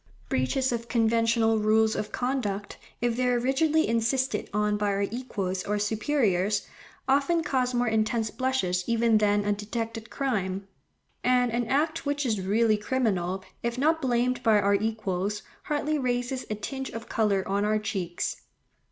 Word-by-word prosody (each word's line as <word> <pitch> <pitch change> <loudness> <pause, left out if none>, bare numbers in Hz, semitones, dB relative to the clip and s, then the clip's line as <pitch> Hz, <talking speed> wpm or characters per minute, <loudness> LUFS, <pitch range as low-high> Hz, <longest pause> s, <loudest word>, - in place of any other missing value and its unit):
Breaches 250 - +1
of 235 -1 -3
conventional 230 -1 +2
rules 220 +1 +3
of 210 - -3
conduct, 230 -6 -2 0.2
if 240 -1 +1
they 250 +1 +1
are 245 0 +3
rigidly 295 +6 +2
insisted 230 0 0
on 210 0 +1
by 210 0 0
our 200 0 +1
equals 200 -5 -3
or 210 +1 -1
superiors, 210 -3 +1 0.4
often 285 +5 +2
cause 255 -4 0
more 245 0 +1
intense 220 0 +1
blushes 255 -9 0
even 230 -1 +3
than 205 -1 +2
a 205 - +2
detected 225 +2 -5
crime, 195 -8 -2 0.6
and 250 -1 +3
an 240 0 -1
act 310 +5 0
which 285 0 -1
is 215 -5 0
really 215 +3 +2
criminal, 195 -6 -1 0.2
if 235 +1 -2
not 320 +4 +2
blamed 245 -1 +1
by 220 -3 +4
our 200 0 +2
equals, 205 -1 -1 0.2
hardly 300 0 0
raises 250 0 -2
a 215 - -1
tinge 265 +6 -5
of 230 0 -7
colour 200 -4 +1
on 200 +1 0
our 215 +1 +2
cheeks. 185 -5 -3
225 Hz, 155 wpm, -27 LUFS, 205-255 Hz, 0.6 s, by